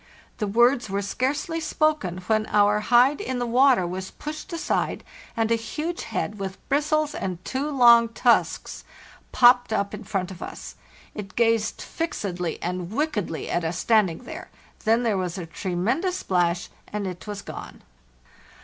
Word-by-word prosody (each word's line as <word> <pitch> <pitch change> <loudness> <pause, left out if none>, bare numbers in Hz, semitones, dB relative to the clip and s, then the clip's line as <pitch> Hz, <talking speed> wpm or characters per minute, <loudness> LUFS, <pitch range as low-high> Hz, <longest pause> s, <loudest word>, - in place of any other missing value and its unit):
The 210 - -1
words 240 +2 +3
were 200 +1 -1
scarcely 290 - -1
spoken, 305 - 0
when 215 +1 +1
our 205 0 +3
hide 245 +6 +4
in 260 -1 -3
the 245 - -1
water 250 -3 +4
was 185 +2 -4
pushed 305 +5 -7
aside 335 - -1 0.3
and 225 0 +1
a - - +5
huge 305 +10 -4
head, 210 0 -3
with 195 -1 -4
bristles 305 +1 +1
and 185 - -3
two 275 +3 -2
long 235 -4 +6
tusks, 235 +1 +1 0.5
popped 245 -1 +5
up 200 -2 0
in 210 - -6
front 195 -3 -3
of 180 - -10
us. - - -7 0.4
It 195 -2 -8
gazed 230 -2 +1
fixedly 185 - -3
and 180 0 -3
wickedly 220 - -2
at 175 - 0
us 165 +1 -2
standing 215 -4 +2
there, - - -8 0.4
then 225 +2 +3
there 215 -5 +1
was 180 0 -3
a 180 - -5
tremendous 205 - -1
splash 175 -1 0 0.2
and 210 -1 -4
it 180 +2 -6
was 205 -1 -5
gone. - - -9
220 Hz, 160 wpm, -25 LUFS, 190-260 Hz, 0.5 s, long